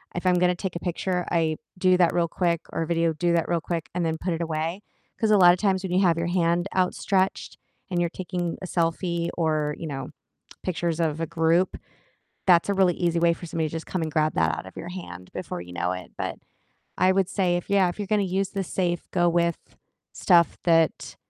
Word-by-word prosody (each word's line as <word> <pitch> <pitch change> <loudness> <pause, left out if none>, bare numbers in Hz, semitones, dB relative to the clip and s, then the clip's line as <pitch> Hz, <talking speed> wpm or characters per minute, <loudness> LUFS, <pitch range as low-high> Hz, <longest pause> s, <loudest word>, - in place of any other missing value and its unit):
if 175 - -4
I'm 180 -1 +4
gonna 180 0 +3
take 180 0 -5
a - - -2
picture, 180 +1 -2
I 160 -2 +1 0.2
do 185 0 +4
that 175 -2 +3
real 170 -1 +2
quick, 170 -1 0
or - - -1
a - - -5
video, 165 -1 +1
do 175 +2 0
that 170 -1 +1
real 170 -1 +1
quick, 165 -1 -4
and 175 - 0
then 160 0 -1
put 180 +1 -2
it 165 - -3
away, 165 +3 -2 0.4
'cause 220 - +1
a 210 - +6
lotta 175 -1 +7
times 190 -1 +1
when 185 - -4
you 185 - +3
have 170 -4 +3
your 170 0 -1
hand 175 0 +1
outstretched 190 +1 0 0.3
and 175 - 0
you're 170 - +1
taking 175 -1 -4
a - - -5
selfie, 170 0 -1
or, 155 -3 0
you 165 - -5
know, 135 -3 -5 0.5
pictures 170 -2 -2
of 160 -1 0
a - - -1
group, 170 +3 +1 0.7
that's 175 -1 +5
a 200 - +1
really 185 -3 +3
easy 170 -2 0
way 170 0 +4
for 175 - -11
somebody 160 -1 -1
to - - -14
just 165 0 -5
come 185 - -3
and 155 - -2
grab 155 0 +2
that 80 0 +1
out - - -7
of 95 - -13
your 175 - -6
hand 90 - -9
before - - -5
you 90 0 -10
know 85 +1 -1
it, 90 0 -8
but - - -3 0.6
I 185 - +4
would 190 -1 +1
say 185 -3 +1
if 175 - -5
yeah, 195 -3 +4
if 175 - -6
you're 205 - -3
gonna 210 -2 +2
use 190 +1 -1
the 195 -1 -2
safe, 175 -1 -2
go 175 -1 +2
with 170 0 +1 0.5
stuff 170 -3 +3
that 165 -2 +2
170 Hz, 230 wpm, -25 LUFS, 165-185 Hz, 0.7 s, lotta